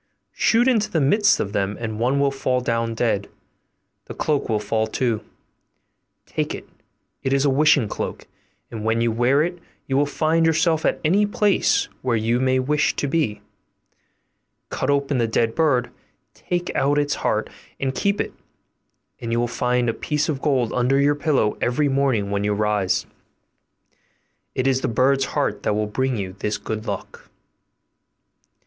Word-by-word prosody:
Shoot 235 +2 +3
into 225 -5 +2
the 165 - 0
midst 205 +9 +3
of 100 - -3
them, 100 +1 -1
and 110 -2 -4
one 130 +4 +1
will 140 0 +2
fall 130 -2 0
down 115 -2 -1
dead: 110 -4 0 0.8
the - - -9
cloak 150 -5 -1
will 110 - +2
fall 110 +1 -1
too; 115 -1 -1 1.0
take - - -3
it, - - -10 0.5
it 130 - -2
is 140 +1 +2
a 140 - +3
wishing 145 -3 +4
cloak, - - -5 0.5
and 110 -2 -6
when 110 +1 +1
you 115 0 +2
wear 125 +6 +3
it 175 +1 -4 0.3
you 135 - -2
will 145 +1 +3
find 160 +3 +1
yourself 160 0 +2
at - - 0
any 200 +6 +3
place 205 -1 +2
where 125 -3 +1
you 115 +3 +1
may 130 0 +2
wish 145 +3 +1
to - - -1
be. 140 -8 -1 1.3
Cut - - -2
open 140 -1 +1
the 115 - +2
dead 115 0 +1
bird, 135 -6 +1 0.4
take 175 0 -3
out 145 +2 +2
its 145 -1 +1
heart - - -1 0.3
and 135 -1 -1
keep 200 +8 0
it, - - -2 0.9
and 115 -1 -5
you 115 - +1
will 120 - +1
find 125 0 0
a 115 - +1
piece 150 +4 -1
of 145 -5 -2
gold 130 -6 +1
under 125 +2 +2
your 145 +1 +4
pillow 140 -7 +1
every 145 +4 +1
morning 135 -7 +1
when 100 0 0
you 105 0 +1
rise. 105 -2 0 1.5
It 130 - 0
is 130 -1 +2
the - - 0
bird's 135 +3 +2
heart - - -2
that 105 - 0
will 105 0 0
bring 130 +4 -1
you 95 -2 -4
this 105 0 -1
good 110 0 -5
luck. - - -6
130 Hz, 170 wpm, -22 LUFS, 115-145 Hz, 1.5 s, wishing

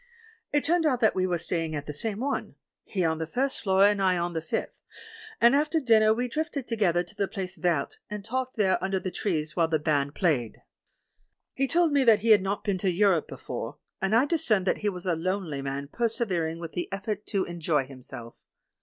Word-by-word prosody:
It 290 0 +2
turned 335 +3 +2
out 255 -5 +1
that 220 - +4
we 185 0 0
were 175 -1 0
stapng 165 -1 -2
at 145 -1 -4
the 150 - -5
same 210 +7 -2
one, 280 +2 -2 0.3
he 185 -4 -1
on 160 0 0
the 160 - -3
first 265 - -1
floor 190 -1 +3
and 205 0 +4
I 185 -2 +3
on 175 0 -2
the 160 - -2
fifth, 155 - -3 0.7
and 240 +3 +6
after 305 +3 +2
dinner 220 -5 +4
we 245 +3 0
drifted 290 -1 -3
together 190 -7 +1
to 175 - -15
the 205 -1 -1
place 190 -2 -5
Verte, 170 -6 -1
and 210 -1 -6
talked 255 +2 -3
there 190 -3 +2
under 190 0 0
the 185 - -4
trees 160 -7 -2
while 165 -2 +3
the 160 -1 +1
band 145 -1 0
played. 140 - 0 0.9
He 270 0 0
told 335 +2 +3
me 285 -2 +3
that 225 -4 +5
he 225 +1 +3
had 210 -3 +7
not 195 +2 -2
been 200 -3 -1
to 190 - +1
Europe 185 -2 +2
be - - -9
fore, - - -6 0.2
and 195 +3 +2
I 245 +4 +5
discerned 285 - +1
that - - +1
he 210 - 0
was 180 -2 -5
a 175 -2 +1
lonely 170 -4 -2
man 140 +1 -4
persevering 190 -6 -1
with 165 -1 -7
the 175 - -4
effort 205 +1 -4
to 195 -3 0
enjoy 165 -5 0
himself. 125 -3 -9
190 Hz, 220 wpm, -27 LUFS, 165-225 Hz, 0.9 s, had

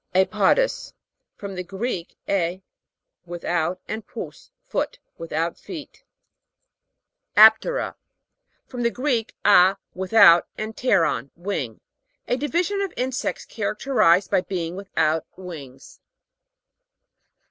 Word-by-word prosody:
A'PODOUS. 210 - +2 0.4
From 200 -1 -7
the 180 -1 -4
Greek, 190 -1 -5
a> 185 -1 -1 0.6
with 175 0 -7
out, 175 +1 0
and 220 0 -4
pous, - - -9 0.2
foot. - - -2 0.2
Without 165 0 -3
feet. 315 -5 -10 1.3
AP'TERA. 220 - +6 0.7
From 250 -2 -6
the 235 - +2
Greek, 245 -3 -1
a, 195 -1 +6 0.2
with 190 +3 -6
out, 195 -6 +8
and 220 +1 -5
pteron, 140 - +1
wing. 170 - -4 0.5
A - - +1
division 345 +9 -1
of 395 -2 -2
insects, 255 0 -2
characterized 205 -9 +1
by - - +3
being 175 -2 -4
without 160 -5 0
wings. 145 -8 -10
195 Hz, 105 wpm, -23 LUFS, 170-240 Hz, 1.3 s, out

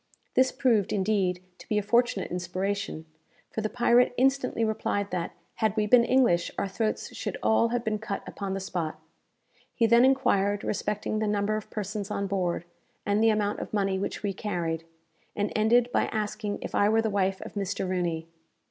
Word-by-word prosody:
This 260 0 +4
proved, 240 -7 +2
indeed, 190 -3 0 0.2
to - - -14
be 210 - +1
a 210 - +1
fortunate 235 -2 +1
inspiration; 185 0 -3 0.5
for 220 - -3
the 215 - -1
pirate 245 +1 +3
instantly 260 -3 +2
replied 205 -2 -1
that, 175 -2 -2 0.2
had 220 -3 +1
we 215 -1 +2
been 235 +3 +6
English, 235 -9 +3
our - - 0
throats 215 +3 -2
should - - -4
all 225 +1 +4
have 240 0 -1
been 215 -2 -1
cut 210 -2 -4
upon 195 -1 -4
the - - -2
spot. 175 -4 -3 0.8
He 230 - +3
then 235 +2 +6
enquired 205 -7 +2
respecting 210 +1 -2
the 215 - 0
number 205 0 +1
of 215 - -5
persons 210 0 -4
on 200 -1 -2
board, 180 -3 -1 0.4
and 205 +1 +2
the 225 - +6
amount 210 -1 0
of - - -6
money 195 -2 +1
which 200 - -4
we 200 -1 -1
carried, 170 -5 -3 0.5
and 205 0 -1
ended 235 +3 +3
by - - +2
asking 210 -1 -3
if - - -6
I 205 - +3
were 225 +1 +3
the 220 - 0
wife 195 -1 +1
of - - -9
Mr. 200 -1 -2
Rooney. 170 -3 -1
205 Hz, 185 wpm, -27 LUFS, 195-225 Hz, 0.8 s, been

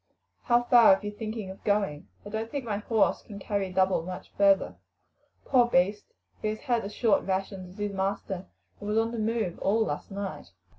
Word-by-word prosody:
How 240 0 +4
far 235 -5 +7
are - - -8
you 205 - -3
thinking 215 -2 -5
of 190 - -13
going? 200 -8 0 0.2
I - - -7
don't 220 +2 -3
think 275 0 -4
my 210 -3 -1
horse 215 0 +1
can 205 - -10
carry 200 -1 -2
double 185 -1 +2
much 180 +2 -8
further. 200 -1 +3 0.7
Poor 245 -3 +4
beast, 205 -1 +2 0.4
he - - -1
has 215 0 -3
had 240 -2 0
as 200 - -5
short 225 -4 +3
rations 190 -1 -3
as - - -18
his 205 -1 -2
master, 195 -1 -3 0.3
and 205 - -6
was 210 - +1
on 225 +1 +2
the 235 - -4
move 215 -5 -1
all 220 +3 +2
last - - -4
night." 200 -1 -6
205 Hz, 200 wpm, -28 LUFS, 195-225 Hz, 0.7 s, far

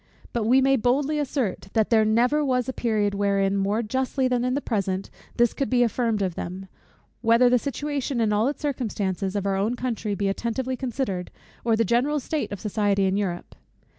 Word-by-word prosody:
But 235 -3 0
we 255 +4 +5
may 270 0 +4
boldly 275 +6 +1
assert, 255 -10 -2
that 220 +1 +1
there 220 -1 +5
never 245 +7 +2
was 255 -3 0
a 260 - -2
period 215 -5 0
wherein, 200 -1 +1
more 200 +4 0
justly 260 +3 0
than 250 -1 0
in 255 +1 0
the - - +1
present, 195 -7 -2 0.3
this 240 -1 +3
could 275 - -2
be 245 -1 +4
affirmed 230 -3 0
of 185 -2 -1
them; 185 +3 -6 0.5
whether 235 +2 +5
the 250 - +4
situation, 280 -1 -3
in 220 -2 +2
all 215 +4 +2
its 290 +2 -4
circumstances, 205 -8 -2
of 200 -1 -1
our 195 -1 +1
own 215 +5 0
country 230 -4 -2
be 200 0 -1
attentively 235 +6 -2
considered, 245 -8 -3 0.3
or 230 -1 +3
the 230 +1 +2
general 260 +8 +1
state 305 +3 -3
of 205 - -5
society 205 -1 +1
in 190 0 +1
Europe. 185 -4 -3
230 Hz, 195 wpm, -25 LUFS, 200-255 Hz, 0.5 s, we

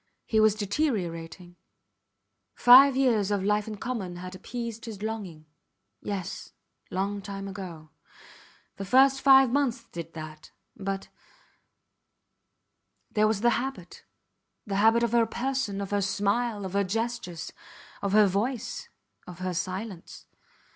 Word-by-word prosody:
He 220 - +1
was 215 -1 +5
deteriorating. 180 - -3 1.0
Five 260 +2 +8
years 230 -7 +2
of 200 -2 0
life 210 +1 +1
in 215 -1 -6
common 210 -7 -4
had 180 +1 -8
appeased 230 +3 -6
his 215 -3 -7
longing. 195 -8 -5 0.6
Yes, 195 -2 -5 0.4
long 200 +2 -2
time 195 0 -6
ago. 180 -6 -8 0.9
The 195 - -5
first 265 +5 +4
five 270 -2 +7
months 260 -4 0
did 170 -6 -9
that 155 -1 -9 0.3
but... 195 0 -4 2.0
There 215 0 +3
was 215 -2 0
the 240 +1 +4
habit 225 -10 -7 0.6
the 200 -3 -2
habit 225 +3 +4
of 235 - +1
her 235 -1 +3
person, 245 -4 -2
of 200 -1 -5
her 205 0 +1
smile, 205 +2 0
of 190 - -6
her 200 0 +2
gestures, 200 -5 -4 0.5
of 200 -1 -1
her 210 0 +7
voice, 235 - -2 0.4
of 180 - -9
her 185 0 -3
silence. 185 +1 -5
205 Hz, 130 wpm, -27 LUFS, 190-235 Hz, 2.0 s, Five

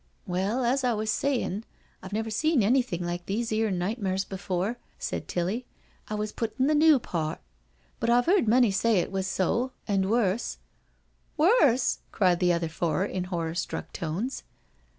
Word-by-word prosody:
" - - -40
Well, 195 +8 0
as 260 +3 +1
I 245 -1 +2
was 215 0 -1
sayin', 240 -7 -1 0.4
I've 190 - -9
never 220 +1 -2
seen 295 +3 +2
anything 220 -6 +1
like 175 0 -4
these 225 +4 -1
'ere 220 0 +1
nightmares 190 +1 -1
before," 195 +3 -3 0.2
said - - -4
Tilly, 195 +8 -2 0.2
" - - -35
I 215 - -2
wa3 210 0 -3
put 230 +2 -3
in 260 - +4
the 305 - +3
new 305 0 +6
part; 165 -9 -3 0.6
but 230 -3 0
I've 245 +1 +4
heard 360 - +3
many 240 -1 +5
say 210 +2 +2
it 175 - 0
was 190 -1 -1
so— 235 +8 0
and 195 -2 +1
worse," 225 -1 +1 0.8
"Worse 300 - +4
I" - - -16
cried 180 -4 +3
the 180 -1 +3
other 170 -1 0
four 165 +2 -1
in 185 -3 -3
horror 170 -3 -3
struck 170 - -4
tones. 180 +11 -3
210 Hz, 180 wpm, -27 LUFS, 185-245 Hz, 0.8 s, new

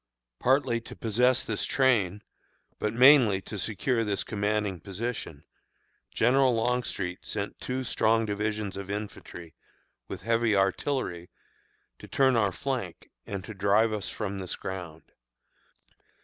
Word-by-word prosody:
Partly 130 -2 +2
to - - -10
possess 120 +3 +2
this 105 - -2
train, 105 -7 +2 0.6
but 105 - 0
mainly 125 -4 +6
to 105 +1 -7
secure 115 +5 0
this 105 -2 -1
commanding 105 -2 -1
position, 100 -7 -5 0.7
General 130 +1 +3
Longstreet 115 -6 -1
sent 100 -1 -4
two 130 +1 -3
strong 115 -2 +2
divisions 105 -1 -2
of 100 0 -7
infantry, 100 -5 -7 0.5
with - - -7
heavy 115 -1 +2
artillery, 95 -2 -1 0.7
to - - -11
turn 130 -2 +3
our 105 -4 +2
flank, 120 -4 -4 0.2
and 100 -2 -4
to 110 - -8
drive 105 +3 +2
us 105 -2 -3
from 100 -2 -4
this 95 -2 -4
ground. 90 -4 -7
105 Hz, 125 wpm, -28 LUFS, 95-120 Hz, 0.7 s, mainly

